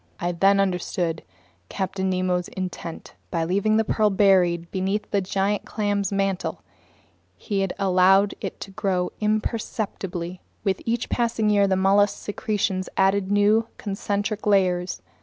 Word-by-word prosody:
I 175 0 -1
then 195 +3 +3
understood 180 -3 -1 0.5
Captain 190 -1 -2
Nemo's 185 -1 0
intent. 180 -3 -6 0.2
By 165 -2 -1
leaving 200 +5 +2
the 220 - +3
pearl 215 0 +2
buried 180 -4 +3
beneath 195 +3 -2
the 200 - +2
giant 195 +2 -1
clam's 205 -2 -1
mantle, 195 -1 -1 0.7
he 195 -2 -1
allowed 195 +1 +4
it - - -5
to 195 - -7
grow 190 -3 -1
imperceptibly. 210 -5 -2 0.2
With 195 -3 0
each 235 +1 0
passing 230 -3 +1
year 200 -1 +4
the 190 - +2
mollusk's 195 +2 +3
secretions 200 -3 -2
added 195 0 +2
new 210 +2 +3
concentric 205 +1 -3
layers. 185 -3 +1
195 Hz, 130 wpm, -24 LUFS, 185-205 Hz, 0.7 s, allowed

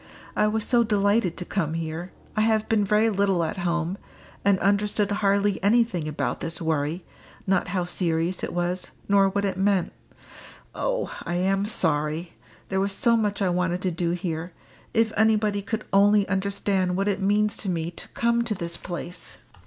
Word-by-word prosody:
I 210 - +3
was 215 0 0
so 240 -2 +4
delighted 205 -3 +1
to 180 - -5
come 165 -5 -1
here. 165 +2 -4 0.2
I 215 - +2
have 220 0 +2
been 220 -2 +2
very 215 +3 +3
little 195 -3 +2
at 165 +4 -3
home, 170 +1 -1 0.4
and 200 -1 +4
understood 205 +1 +1
hardly 200 -1 +1
anything 210 -6 +2
about 150 - -2
this 165 - -2
worry 160 +1 -1 0.4
not 190 -1 +1
how 180 -1 -1
serious 175 0 -1
it - - -2
was, 175 +1 -2 0.2
nor 200 -1 +4
what 200 +1 -1
it 190 -2 -2
meant. 195 -2 +1 0.8
Oh! - - -2
I 175 - -3
am 195 +3 +1
sorry 160 -3 0 0.4
there 190 - 0
was 195 0 0
so 235 +3 +4
much 210 -2 0
I 185 - +2
wanted 180 +1 0
to 185 - +1
do 170 0 -1
here 170 -1 -3 0.4
if 225 -1 +2
anybody 215 -2 +2
could 215 +2 -4
only 205 +1 +5
understand 190 -1 0
what 195 +1 0
it 200 -1 0
means 210 +2 +2
to 195 - -3
me 170 -1 -2
to - - -8
come 235 0 +1
to 220 -2 -1
this 170 -1 -3
place!" 175 -1 -7
195 Hz, 175 wpm, -25 LUFS, 175-210 Hz, 0.8 s, only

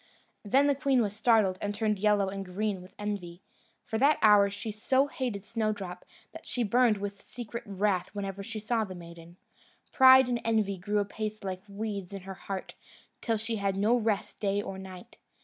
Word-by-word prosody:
Then 265 +7 +3
the 285 - +4
queen 270 -2 +2
was 205 -1 -3
startled, 215 -5 +3
and 205 0 -2
turned 210 -2 0
yellow 205 -1 +3
and 195 0 -5
green 195 +1 -2
with 185 - -15
envy. 195 -4 -5 0.4
From 220 - -2
that 285 +4 +5
hour 205 -2 +7
she 205 +2 -5
so 260 +6 +2
hated 255 - -4
Snowdrop, 210 -5 -3 0.3
that - - -10
she 245 - -1
burned 235 0 +3
with 200 0 -5
secret 235 -1 -7
wrath 195 -2 0
whenever 200 -1 -5
she 220 +2 -5
saw 220 +1 0
the 190 -3 -7
maiden. 170 0 -12 0.5
Pride 260 -1 +8
and 240 -1 -1
envy 215 -4 0
grew 205 +3 -1
apace 215 +1 -3
like 185 -1 -4
weeds 200 -2 -5
in 195 - -6
her 190 +1 -7
heart, 190 0 -6 0.5
till 225 -2 0
she 225 +1 -3
had 195 -1 -1
no 215 +5 +3
rest 220 -3 -1
day 200 -1 0
or 195 -2 -5
night. 185 -1 -11
205 Hz, 185 wpm, -29 LUFS, 195-225 Hz, 0.5 s, Pride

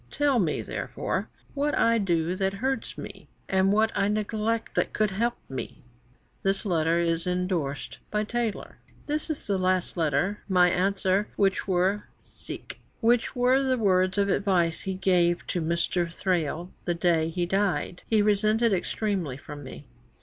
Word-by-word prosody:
Tell 280 - +2
me, 165 -7 0
therefore, - - -3 0.2
what 290 +1 0
I 230 0 +4
do 175 -3 0
that 195 0 0
hurts 265 +6 -2
me, - - -9 0.2
and 190 0 +3
what 220 +2 +3
I 200 - +2
neglect 215 +2 -1
that - - -1
would 215 -2 +3
help 235 +5 0
me." 130 - -7 0.6
This 195 +2 0
letter 165 -3 +2
is 170 0 0
endorsed 180 -6 -2
by 210 0 0
Taylor: 230 -1 -3 0.3
"This 300 +2 -2
is 310 - -3
the 200 -2 0
last 185 -1 +1
letter. 165 +6 +1
My 180 -2 +5
answer, 190 +2 +1
which 195 -1 +1
were 190 +2 +1
the 250 +3 0
words 185 -2 +2
of 200 0 +3
advice 180 -4 +1
he 190 -1 -3
gave 175 -2 +2
to 175 - -2
Mr. 170 +1 0
Thrale 175 -1 -1
the 175 - 0
day 170 -2 +2
he 175 +1 -1
dyed, 190 -1 0
he 215 -2 +3
resented 215 +2 +3
extremely 185 - -1
from 145 0 -9
me."' 135 +2 -10
190 Hz, 150 wpm, -27 LUFS, 175-215 Hz, 0.6 s, My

